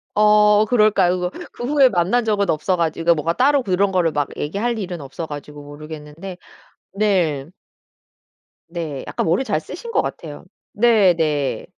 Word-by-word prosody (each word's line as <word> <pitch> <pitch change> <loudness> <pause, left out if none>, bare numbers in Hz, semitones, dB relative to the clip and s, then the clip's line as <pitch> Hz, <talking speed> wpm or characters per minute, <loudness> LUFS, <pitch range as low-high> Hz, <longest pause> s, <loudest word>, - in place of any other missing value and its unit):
어 210 0 +5
그럴까요 210 -6 +3
그거? 180 0 -2 0.2
그 - - -8
후에 275 0 +4
만난 195 +5 +1
적은 205 -3 0
없어 160 +4 0
가지고 170 0 +1
뭔가 165 +2 -1
따로 275 +4 +2
그런 195 -1 +1
거를 175 -4 +1
막 145 -2 -1
얘기할 210 +10 -2
일은 180 -5 -5
없어 135 +4 -7
가지고 145 -1 -9
모르겠는데 150 +4 -9 0.6
네. 180 -9 0 1.2
네. 165 -5 -5
약간 - - -2
머리 175 +10 +1
잘 - - -1
쓰신 470 - -9
것 - - +2
같아요. - - -7 0.3
네네. 175 - +2
180 Hz, 295 characters per minute, -20 LUFS, 155-210 Hz, 1.2 s, 어